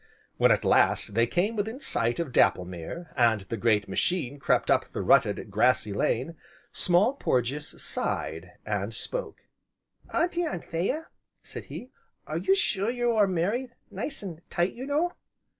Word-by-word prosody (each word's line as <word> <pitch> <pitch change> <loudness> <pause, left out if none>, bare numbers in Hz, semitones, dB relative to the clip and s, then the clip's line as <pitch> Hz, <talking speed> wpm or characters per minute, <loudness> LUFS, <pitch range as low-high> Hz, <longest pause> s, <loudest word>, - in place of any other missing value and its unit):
When, - - +5
at - - +3
last, - - +3
they 115 +2 +3
came 190 - 0
within 220 +4 -2
sight 120 - -1
of 165 -6 -2
Dapplemere, 90 - 0
and 115 -5 +3
the 95 +4 -5
great 110 -3 +2
machine 145 -6 -1
crept - - +2
up - - +3
the - - -4
rutted, - - +3
grassy 125 -5 +2
lane, 130 +10 -1 0.3
Small 185 +8 +3
Porges 140 - -1
sighed, 80 +3 -3
and 105 +1 -2
spoke: - - -5 0.7
"Auntie 345 +1 +1
Anthea," 200 - -2 0.3
said - - -8
he, 255 - -9 0.3
"are - - -3
you 385 - +3
sure 205 - 0
that 240 - -1
you 240 -1 +1
are 215 -3 +4
married 210 +8 -1 0.2
nice 205 +6 -4
an' 170 -4 -7
tight, 175 +2 0
you 255 +3 -7
know?" 310 +5 +1
175 Hz, 155 wpm, -27 LUFS, -, 0.7 s, When